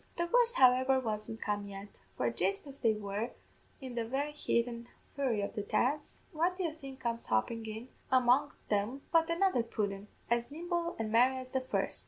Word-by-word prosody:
The 345 0 0
worst, 485 -1 +5
however, 260 +1 +5
wasn't 220 -2 -4
come 205 -1 -1
yet, 200 0 -9 0.2
for 120 -1 +1
jist 190 - 0
as 280 -1 -11
they 225 -3 +3
were 210 +2 -3 0.5
in 260 -3 -7
the 235 -1 -1
very 270 +6 -1
heat 240 -5 +1
an' 235 -1 -7 0.3
fury 260 -7 0
of - - -3
the 215 - -2
dance, 260 +8 -1
what 350 +2 +1
do 380 - -1
you 325 -3 -1
think 275 -4 -10
comes 235 -2 -3
hoppin' 225 - +1
in 220 +3 -6 0.2
among 260 +2 +4 0.2
them 215 +7 0
but 330 0 +4
another 340 -5 +3
pudden, 205 -3 -3 0.2
as 235 0 +1
nimble 340 +2 -2
an' 220 -1 -2
merry 250 +3 +5
as 255 0 -7
the 265 0 0
first! 255 - -1
245 Hz, 195 wpm, -33 LUFS, 215-285 Hz, 0.5 s, worst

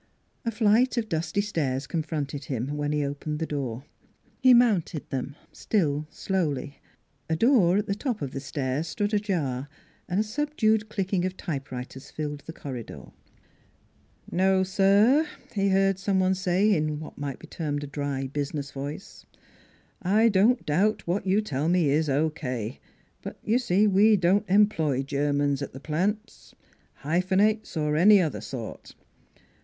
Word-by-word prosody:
A - - +1
flight 230 +3 +3
of 220 -2 -1
dusty 165 +4 -1
stairs 145 -10 -2
confronted 150 -3 -3
him, 130 +2 -3
when 145 0 -2
he 150 -1 0
opened 145 +2 -4
the 160 - -2
door. 135 -5 -4 0.6
He 260 -1 +6
mounted 215 - +3
them, 135 +1 -3 0.2
still 150 -7 -1
slowly. 150 -6 -2 0.5
A 160 - +2
door 195 - +4
at 210 - 0
the 200 - -1
top 230 +1 -3
of 135 - -4
the 135 - -4
stair 135 0 -2
stood 205 +6 -2
ajar 150 -11 -1 0.4
and 180 +3 0
a - - +3
subdued 220 -4 0
clicking 190 -3 -1
of 185 0 -3
typewriters 135 -5 -6
filled 150 -1 -5
the - - -5
corridor. 130 -7 -8 0.6
" - - -26
No, 190 0 +4
sir," 200 +10 +4 0.3
he 200 -2 +1
heard 195 0 +2
some 195 0 +1
one 185 0 +3
say, 190 +3 +2
in 155 -2 -1
what 155 - -10
might 140 -3 -4
be - - -13
termed 145 -3 -3
a - - -3
dry, 140 -1 -3
business 140 +1 -4
voice; 145 +7 -8 0.4
" - - -34 0.2
I 230 +1 +6
don't 215 +5 +3
doubt 195 +9 +1
what 185 +3 -1
you 195 +3 +3
tell 150 -6 -2
me 170 -5 +3
is 155 +1 +1
O.K.; 135 -5 -2 0.4
but - - -7
y' 225 +3 +2
see 210 -5 +2
we 210 +2 +5
don't 190 +3 +2
employ 165 -9 +3
Germans 145 0 0
at 140 - -5
the 135 - -8
plant 195 +9 -3 0.5
hyphenates, 190 +6 +1
or 150 -1 0
any 200 +6 +7
other 150 - -1
sort. 115 0 -8
165 Hz, 160 wpm, -26 LUFS, 145-205 Hz, 0.6 s, any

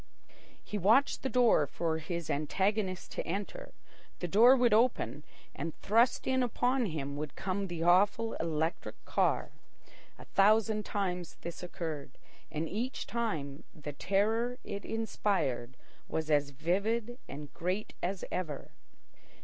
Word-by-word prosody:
He 210 - -4
watched 225 +9 +4
the 265 - -1
door 235 - +4
for 160 +2 -1
his 170 0 -4
antagonist 190 +5 0
to - - -3
enter. 205 - -4 0.5
The 175 - -3
door 230 +9 +7
would 245 -4 +4
open, 210 - +2 0.3
and 160 +3 -5
thrust 230 +5 +3
in 260 0 +2
upon 245 +1 +1
him 140 -4 -4
would 150 -1 -5
come 195 +1 -2
the 170 -2 -3
awful 200 +6 +4
electric 160 0 -1
car. - - +1 0.7
A - - -12
thousand 215 +1 +3
times 180 -4 -2
this 170 0 -6
occurred, 160 -6 -5 0.3
and 155 +2 -2
each 235 +8 -3
time 160 -12 -3
the 150 -1 -7
terror 220 - +1
it 200 0 -5
inspired 165 - -1 0.3
was 160 -1 -2
as 145 -1 +3
vivid 205 - -1
and 145 0 -8
great 185 +5 -2
as 185 +1 -2
ever. 155 -6 -4
190 Hz, 135 wpm, -32 LUFS, 160-225 Hz, 0.7 s, door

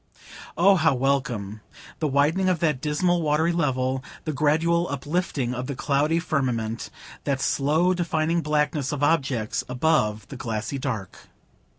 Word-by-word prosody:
Oh, 190 +3 +5
how 160 -4 +3
welcome, 125 -6 -1 0.4
the 155 - 0
widening 150 +7 +2
of 180 - +2
that 155 -5 0
dismal 170 +4 +1
watery 155 +2 +2
level, 130 -5 0 0.2
the 155 - -2
gradual 160 +4 +2
uplifting 145 -3 -2
of 125 0 -4
the 140 - -4
cloudy 145 +5 +1
firmament, 125 -9 -1 0.3
the 140 -1 0
slowly 155 +7 +2
defining 170 -1 0
blackness 150 -2 0
of 145 -1 -3
objects 135 -8 +1
above 125 -6 +1
the 135 - -7
glassy 115 +3 -3
dark! 110 -9 -5
145 Hz, 140 wpm, -25 LUFS, 130-160 Hz, 0.4 s, Oh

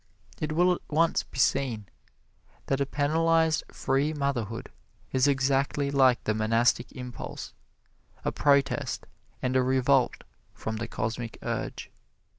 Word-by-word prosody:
It 155 0 -2
will 180 +3 +4
at - - -5
once 165 +2 +2
be - - -13
seen 125 -3 +1 0.8
that 135 0 0
a 140 - +1
penalized 160 +2 +2
free 140 +3 0
motherhood 125 -7 -2 0.4
is 130 +1 +3
exactly 140 +1 +1
like 130 -3 +4
the 110 - +1
Monastic 115 +2 +2
Impulse 125 -2 -7 0.7
a - - +1
protest 140 -1 +1 0.4
and 130 0 0
a 130 - +5
revolt 130 0 +2 0.3
from 110 0 -4
the 115 +1 -4
Cosmic 115 +1 -4
Urge. - - -4
135 Hz, 125 wpm, -28 LUFS, 120-145 Hz, 0.8 s, a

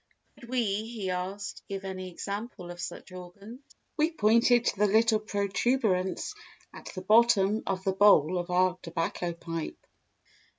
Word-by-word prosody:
Could 235 - -13
we, 255 -1 +1
he 210 -1 -3
asked, 190 +3 -4
give 195 0 -5
any 185 -1 -5
example 200 0 -6
of 175 - -10
such - - -7
organs? 190 +6 -10 0.4
We 310 +1 +3
pointed 235 -3 +3
to - - 0
the 210 - +4
little 220 +2 +3
protuberance 200 - 0 0.4
at - - -11
the 185 - -6
bottom 215 -1 +4
of 190 -1 -2
the 190 - 0
bowl 185 -4 +5
of 175 +1 -5
our 180 0 +2
tobacco 165 +1 -3
pipe. 165 -1 -6
195 Hz, 145 wpm, -28 LUFS, 185-225 Hz, 0.4 s, bowl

